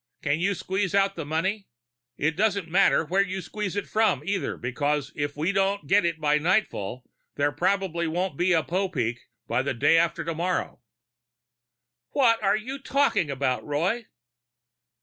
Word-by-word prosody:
Can 145 +1 +1
you 195 +3 +1
squeeze 190 +1 -2
out 195 0 +3
the 165 -4 -5
money? 190 +6 -1 0.5
It 160 +2 0
doesn't 200 -2 +1
matter 170 -1 +3
where 185 +6 +2
you 190 -1 -2
squeeze 205 0 -4
it 205 - -2
from, 210 -11 +1
either, 195 0 -2
because 145 +3 -1
if 145 0 -3
we 160 +5 +1
don't 195 -2 0
get 195 +5 +3
it 170 -2 -1
by 150 -1 +2
nightfall 150 - -1 0.3
there 145 0 +1
probably 180 -1 0
won't 175 0 -2
be 175 +5 +1
a 165 -3 +3
Popeek 165 - -1 0.3
by 120 +2 +1
the 135 -1 -2
day 165 +7 +4
after 170 0 0
tomorrow." 170 -1 -2 1.3
"What 230 -5 +3
are 200 0 +3
you 260 +6 -6
talking 275 - +1
about, 130 -2 -1
Roy?" 180 +11 -1
175 Hz, 160 wpm, -26 LUFS, 150-195 Hz, 1.3 s, day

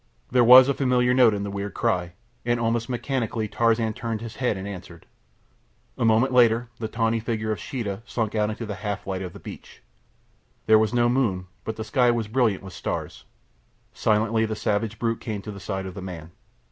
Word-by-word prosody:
There 125 -1 +5
was 125 +2 +9
a 140 - +2
familiar 125 -2 +2
note 125 -4 +5
in 100 - -3
the 100 - -4
weird 100 0 -5
cry, 90 -7 0 0.3
and 120 0 0
almost 115 +1 0
mechanically 120 -3 -2
Tarzan 115 0 +1
turned 115 -1 -4
his 115 -1 -8
head 125 -6 0
and 95 +1 -6
answered. 90 -4 -9 0.9
A - - -2
moment 115 +3 +3
later 120 -1 +4
the 110 - -2
tawny 115 0 0
figure 110 -1 -2
of 110 - -2
Sheeta 115 -8 -4
slunk 115 -3 -2
out 105 -1 +1
into 110 +2 -5
the 105 - -4
half 105 -2 -3
light 95 -1 -3
of 90 -2 -6
the - - -11
beach. - - -11 0.8
There 110 0 +6
was 110 0 +1
no 120 -1 +3
moon, 115 -8 0 0.2
but 110 - -4
the 110 - -5
sky 125 +2 +2
was 115 -2 0
brilliant 110 -4 +1
with 95 -1 -9
stars. - - -5 0.7
Silently 110 +1 +1
the 110 - -3
savage 105 +1 -1
brute 115 0 -1
came 105 -3 -5
to 105 - -6
the 100 - -9
side 95 0 -4
of 95 - -6
the 95 - -8
man. 85 -3 -8
110 Hz, 205 wpm, -24 LUFS, 100-120 Hz, 0.9 s, was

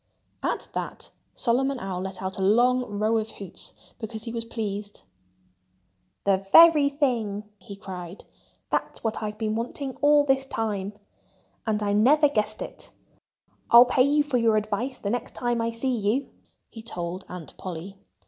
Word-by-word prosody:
At - - -2
that - - -5 0.2
Solomon 265 +2 +1
Owl 190 -3 -4
let 190 0 -6
out 190 +1 -3
a - - -2
long 240 +2 +3
row 220 +2 +2
of 220 0 -4
hoots, 195 -3 -9 0.2
because 220 -1 -6
he 230 - -6
was 230 -1 -3
pleased. 205 -3 -5 1.2
"The 195 -1 +3
very 325 -4 +8
thing!" 230 -8 -1
he 200 +1 -10
cried. 185 -2 -8 0.5
"That's - - -2
what 225 -1 -2
I've 210 0 -4
been 215 -1 -1
wanting 250 +4 -4
all 295 0 +6
this 270 -1 +1
time. 210 -5 -2 0.7
And 215 -1 0
I 205 0 +1
never 285 +9 +5
guessed 215 -4 -1
it.... - - -9 0.8
I'll 235 +1 +9
pay 255 +1 +2
you 290 +3 +4
for 280 -4 0
your 225 -2 +3
advice 215 +5 -2
the 200 - -3
next 245 0 -3
time 240 -1 0
I 230 - 0
see 245 +3 -1
you," 225 +5 -1 0.4
he 225 - -9
told 180 -4 -5
Aunt 180 -3 -8
Polly. 185 +2 -7
220 Hz, 160 wpm, -26 LUFS, 200-250 Hz, 1.2 s, I'll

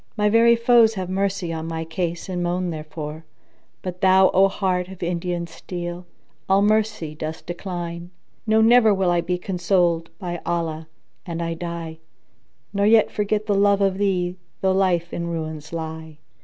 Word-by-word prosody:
My 210 0 +3
very 230 +2 +5
foes 230 -1 +4
have 185 -2 -4
mercy 195 -3 -1
on 160 0 -4
my 165 0 -4
case 170 +1 -3
and 180 -2 -3
moan 175 +1 -1
therefor; 155 0 -7 0.3
* - - -41
But 180 0 -6
thou, 190 0 +5
O 195 +1 +5
heart 185 -2 -1
of 190 -1 -9
Indian 175 0 -2
steel, 175 +1 -7 0.4
all 195 +1 +4
mercy 210 -7 +1
dost 155 +1 -6
decline. 175 -1 -5 0.4
No, 220 +1 +4
never 225 -2 +6
will 190 -2 +1
I 175 0 +2
be 180 +1 -1
consoled, 175 -2 0
by 175 -1 -5
Allah, 160 -2 -2 0.4
an 170 -1 -4
I 165 0 -2
die, 165 -1 -6 0.4
* - - -43
Nor 200 0 +2
yet 220 0 +5
forget 210 0 -1
the 210 - +1
love 200 0 +3
of 195 -1 +1
thee 180 -3 0 0.2
though 190 - +3
life 180 -3 +1
in 170 0 -3
ruins 160 -2 -5
lie!" 160 -1 -6
180 Hz, 170 wpm, -23 LUFS, 170-195 Hz, 0.4 s, never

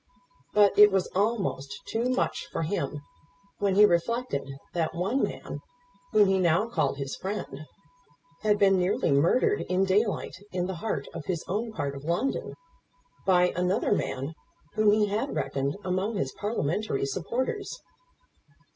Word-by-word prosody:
But 205 -1 +5
it 210 0 +9
was 190 -2 0
almost 200 - -1
too 235 +3 -1
much 255 - -1
for - - -2
him 150 -4 -2 0.6
when 200 -2 +1
he 210 +1 +8
reflected 175 - 0 0.2
that 165 -2 -1
one 195 +10 0
man - - -3 0.5
whom 210 -2 +5
he 190 0 +2
now 175 +4 +3
called 155 - 0
his 140 -1 -4
friend, 185 -7 -5 0.7
had 210 -1 +3
been 195 -1 +5
nearly 180 -3 +1
murdered 210 - +3
in 185 +1 +2
daylight, 205 +1 +1 0.2
in 180 -1 -1
the 190 - -3
heart 225 - -2
of - - -6
his 180 -4 -2
own 220 +5 -2
part 140 -9 -3
of 135 - -8
London, 170 - -1 0.7
by 180 -1 +5
another 180 +2 +1
man 140 -6 -1 0.4
whom 215 -1 +4
he 210 0 +4
had 205 -2 -2
reckoned 140 0 -1
among 190 +4 -1
his 135 -8 -1
Parliamentary 205 -6 -1
supporters. 235 - -3
190 Hz, 145 wpm, -27 LUFS, 160-210 Hz, 0.7 s, it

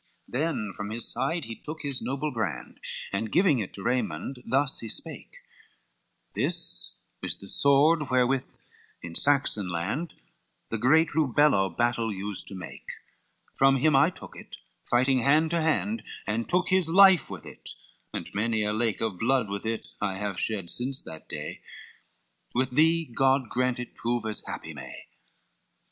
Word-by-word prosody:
LXXII - - -29
Then 145 -11 -1
from 105 0 -5
his 115 +1 -2
side 165 -1 -1
he 115 0 -6
took 155 +5 -8
his 140 -2 -2
noble 140 +3 -2
brand, 110 -9 -4 0.3
And 105 +2 -2
giving 175 -8 +4
it 100 - -4
to 95 - -7
Raymond, 125 - -2
thus 135 +3 +2
he 115 - -6
spake: - - -4 1.0
"This - - +2 0.3
is - - -2
the 100 - -12
sword 140 - +4
wherewith 130 +1 +2 0.6
in 85 - -7
Saxon 130 -4 +2
land, 90 - -3 0.5
The 115 - -3
great 160 +8 +4
Rubello 145 -9 +3
battle 120 -2 +1
used 100 0 -5
to 100 - -8
make, 95 - -8 0.7
From 135 0 +4
him 150 +3 +3
I 140 +4 +5
took - - -12
it, - - -10 0.3
fighting 130 +2 +3
hand 150 +5 +3
to 170 -1 +1
hand, 205 +8 0 0.2
And 115 +2 -2
took 180 0 +2
his 185 -3 +3
life 190 0 +6
with - - -7
it, - - -11 0.4
and - - -5
many 110 +1 0
a 105 0 0
lake 110 -1 -1
Of 110 -6 -2
blood 125 -2 +1
with 100 +2 -4
it 115 0 -2 0.2
I 95 -2 -1
have 100 -2 -3
shed 100 -6 0
since 130 +2 0
that 80 -1 -10
day, - - -6 0.9
With 130 +1 +1
thee 160 +4 +3
God 135 -1 +1
grant 125 0 0
it 125 -1 -7
proves 120 -1 -1
as 110 -1 -2
happy - - -5
may." - - -8
125 Hz, 165 wpm, -27 LUFS, 110-150 Hz, 1.0 s, life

